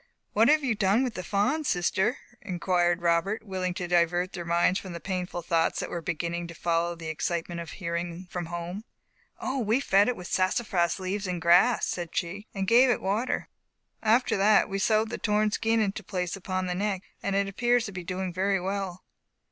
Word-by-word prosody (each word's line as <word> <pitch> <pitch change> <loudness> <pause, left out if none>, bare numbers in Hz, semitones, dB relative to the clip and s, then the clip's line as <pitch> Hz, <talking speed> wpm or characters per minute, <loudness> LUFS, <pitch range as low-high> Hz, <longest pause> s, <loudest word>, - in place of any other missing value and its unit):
"What 220 +2 +5
have 305 +1 +4
you 255 -4 +1
done 205 +3 +2
with 250 -3 -2
the 185 - -5
fawn, 220 - +1
sister?" 190 - +1 0.2
inquired 175 -2 0
Robert, 170 +6 +1
willing 185 -2 -2
to 180 - -3
divert 175 +1 +2
their 175 - -5
minds 170 +2 +2
from 185 -2 -8
the 170 - -5
painful 180 0 -4
thoughts 165 0 +1
that - - -4
were 170 - -3
beginning 170 +1 -3
to 170 - -10
follow 170 0 0
the 165 -1 -10
excitement 170 +2 -2
of 165 - -8
hearing 170 0 -4
from 175 -2 -5
home. 175 +4 -5 0.6
"O, 265 +1 -2
we 225 +1 +2
fed 200 -6 +4
it 250 - +1
with 180 - -9
sassafras 185 -2 +1
leaves 190 +1 -3
and 180 -1 -2
grass," 175 +8 +5
said 170 -2 -4
she, 190 +5 -3
"and 195 -1 -2
gave 245 +4 +6
it 240 - +2
water. 210 +6 -1 0.5
After 230 +3 +3
that 200 +1 +5
we 195 0 -3
sewed 220 +2 +2
the - - -4
torn 210 0 +1
skin 225 +2 +1
to 215 - -7
its 190 - -26
place 180 -2 -2
upon 185 -1 -3
the 180 - -1
neck, 195 0 -1 0.2
and 200 - -1
it 200 0 +2
appears 240 +4 +1
to 200 - -6
be 185 -2 -6
doing 185 +1 -3
very 195 +2 +1
well." 190 -1 -3
185 Hz, 205 wpm, -27 LUFS, 175-210 Hz, 0.6 s, gave